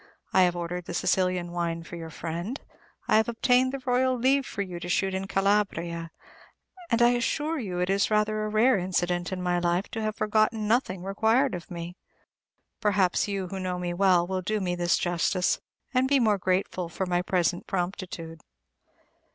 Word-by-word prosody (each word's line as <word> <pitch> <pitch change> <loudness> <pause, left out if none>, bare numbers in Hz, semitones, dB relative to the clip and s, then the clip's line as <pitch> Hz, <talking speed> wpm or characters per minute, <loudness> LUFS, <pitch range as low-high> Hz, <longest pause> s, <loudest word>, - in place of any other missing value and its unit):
I 190 - +5
have 180 -1 +3
ordered 175 0 -4
the 175 - -5
Sicilian 180 -2 +1
wine 170 -1 -2
for 170 - -9
your 165 -1 -7
friend; 170 - -5 0.5
I - - +5
have 220 +2 +2
obtained 250 +2 +3
the 275 -1 -6
Royal 255 +1 +2
leave 265 +3 +2
for 200 - -3
you 180 -3 -7
to 175 - -6
shoot 190 +2 +1
in 190 +1 -3
Calabria; 195 -5 0 0.8
and 235 +1 +3
I 240 - +7
assure 290 +6 0
you 190 -7 -4
it 180 0 0
is 200 +1 +2
rather 215 0 +1
a 215 - -2
rare 215 +1 +4
incident 175 -1 -1
in 185 -1 -3
my 175 0 +1
life 175 +2 0
to 225 - -4
have 215 0 -2
forgotten 215 0 +1
nothing 210 -6 +1
required 225 +7 +2
of 175 -2 -6
me! 175 +1 -7 0.8
Perhaps 200 -4 +2
you, 195 -3 -3
who 195 - -5
know 185 -1 -2
me 175 -1 -3
well, 180 -1 +4
will 185 +1 -2
do 215 +4 -1
me 180 -3 -1
this 175 -1 +1
justice, 175 +1 0 0.3
and 255 0 +3
be 280 - +3
the - - +2
more 210 -3 +3
grateful 185 -1 -1
for 190 +3 -3
my 175 -1 +1
present 180 -1 0
promptitude. 175 -3 -4
190 Hz, 190 wpm, -27 LUFS, 175-215 Hz, 0.8 s, I